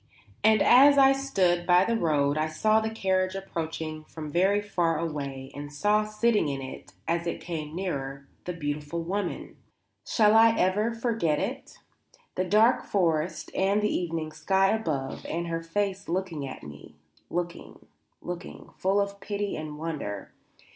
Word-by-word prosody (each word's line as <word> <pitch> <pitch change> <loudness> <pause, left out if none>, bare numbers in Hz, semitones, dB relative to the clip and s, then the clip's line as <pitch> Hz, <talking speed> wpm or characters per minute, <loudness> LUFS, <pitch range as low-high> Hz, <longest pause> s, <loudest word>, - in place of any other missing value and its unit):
And 220 0 +5
as 280 +3 +7
I 270 -1 +7
stood 190 -11 +1
by 180 +1 +5
the 230 - +1
road 150 -7 +2
I 155 +1 0
saw 215 +8 +2
the 220 - -1
carriage 190 -3 0
approaching 160 -4 -5
from 155 -2 -8
very 190 +5 +3
far 175 -6 0
away 140 -4 -4
and 145 0 -7
saw 210 +8 +2
sitting 215 -3 +1
in 140 -1 -2
it, 130 -1 -9
as 170 +1 0
it - - -2
came 155 -3 -5
nearer, 140 -7 -4 0.2
the 180 - -3
beautiful 150 +1 -3
woman. 195 +2 -4 0.5
Shall 215 -1 +3
I 225 0 +6
ever 205 +5 +2
forget 225 -10 0
it? 250 - -4 0.6
The 185 - -1
dark 220 +6 +4
forest 170 -4 0
and 200 +2 +1
the 210 - +1
evening 165 -3 -2
sky 190 +5 +2
above 150 -11 -2
and 170 +2 -2
her 165 -1 -3
face 195 +3 -2
looking 170 -5 -2
at 130 - -9
me 75 0 -11 0.3
looking, 175 0 -5 0.4
looking, 175 -1 -7
full 195 +2 +2
of 200 0 -2
pity 205 0 -3
and 155 -1 -6
wonder. 150 -12 -5
175 Hz, 155 wpm, -27 LUFS, 155-205 Hz, 0.6 s, as